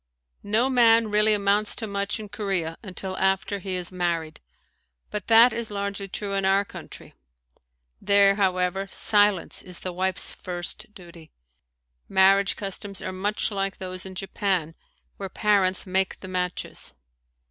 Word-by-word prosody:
No 220 +5 +1
man 230 -4 +4
really 210 +1 +4
amounts 205 0 +2
to 225 - -3
much 200 +1 -2
in 215 - -7
Korea 190 -6 -2
until 190 -2 -6
after 190 +1 0
he 185 0 -4
is 180 -1 -3
married, 170 -3 -2 0.7
but 210 -3 -4
that 230 +1 +7
is 235 -1 -3
largely 200 -1 -3
true 200 +1 -4
in 195 0 0
our 195 +1 +3
country. - - -11 0.9
There, 200 -1 +5
however, 190 -1 0
silence 205 -2 +2
is 180 -2 -7
the 185 - -4
wife's 185 +1 -1
first 175 +3 -6
duty. 170 -4 -14 0.8
Marriage 195 +1 +4
customs 195 0 -4
are 185 - -4
much 205 +4 -1
like 195 -1 -2
those 185 -1 -5
in 190 -1 -7
Japan 190 -4 -2 0.4
where 195 -1 -5
parents 190 -2 +2
make 190 0 -1
the 190 - -8
matches. 180 -1 -4
195 Hz, 145 wpm, -25 LUFS, 185-205 Hz, 0.9 s, that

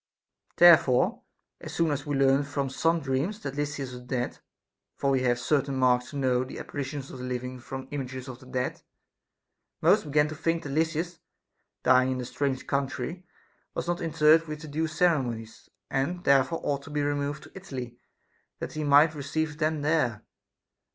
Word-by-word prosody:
Therefore, 170 -7 +6 0.4
as - - -8
soon 165 -2 +2
as 145 +1 -3
we 145 - 0
learned 135 +1 +3
from 140 -2 -2
some 165 +4 +1
dreams 140 +10 -1
that 140 -1 -5
Lysis 145 -2 -3
was 125 0 -8
dead 125 0 -3 0.6
(for 140 - 0
we 135 -1 +2
have 120 -1 +2
certain 140 +2 0
marks 125 -1 +2
to 145 - -10
know 130 -2 +2
the 130 - -8
apparitions 140 -1 -5
of 130 - -9
the - - -6
living 125 0 -4
from 130 +2 -7
images 130 -2 -5
of 130 -1 -8
the 130 - -15
dead), 130 -1 -3 1.0
most - - +4
began 150 0 +3
to 155 - -6
think 165 +2 -1
that 145 - -5
Lysis, 160 +3 -1 0.6
dying 130 +1 +4
in 130 - -4
a 125 - -4
strange 135 +1 -2
country, 150 +6 -3 0.5
was - - -3
not 175 0 -1
interred 160 0 +4
with 150 0 -6
the 155 - -8
due 155 +2 -1
ceremonies, 130 -10 -1 0.2
and 165 +7 -1
therefore 140 +4 +3
ought 140 -1 -1
to 140 - -12
be 150 -1 -1
removed 145 0 -2
to - - -14
Italy 130 -10 -7 0.6
that - - -6
he 155 - -3
might 145 +2 +6
receive 150 +1 -3
them 155 -2 0
there. 145 -8 +1
140 Hz, 180 wpm, -27 LUFS, 130-155 Hz, 1.0 s, Therefore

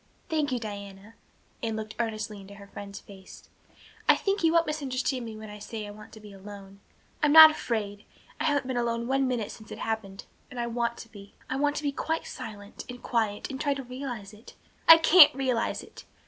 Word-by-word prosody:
"Thank 305 -3 0
you, 250 - 0
Diana." 200 -1 -8 0.5
Anne 225 -1 -2
looked 215 0 -5
earnestly 215 -3 -3
into 195 +1 -12
her 200 0 -12
friend's 200 0 -9
face. 190 -2 -14 0.6
"I - - +8
think 395 -2 -1
you 325 - +4
won't 335 0 +3
misunderstand 265 -4 -2
me 220 -1 -8
when 215 -1 -9
I 210 - -10
say 215 +1 -6
I 205 - -8
want 210 +1 -13
to 220 - -11
be 210 -1 -13
alone. 195 0 -12 0.4
I'm 300 -2 +3
not 315 0 +11
afraid. 210 -8 -4 0.4
I 310 - -1
haven't 290 -3 +1
been 255 -1 -3
alone 235 -1 -1
one 270 0 +1
minute 240 -5 -2
since 220 - -13
it - - -6
happened 220 -3 -4 0.2
and 250 - -8
I 240 - -1
want 235 0 -2
to 230 - -10
be. 200 -2 -14 0.2
I - - 0
want 290 +1 +1
to - - -4
be 285 - 0
quite 320 +3 -3
silent 205 -1 -9
and 245 0 -9
quiet 220 0 -1
and 265 +1 -5
try 285 -2 +1
to 270 - -6
realize 245 -5 -7
it. 215 +2 -15 0.3
I 330 - +11
can't 325 -3 +7
realize 255 -4 -1
it. - - -13
230 Hz, 215 wpm, -27 LUFS, 205-275 Hz, 0.6 s, not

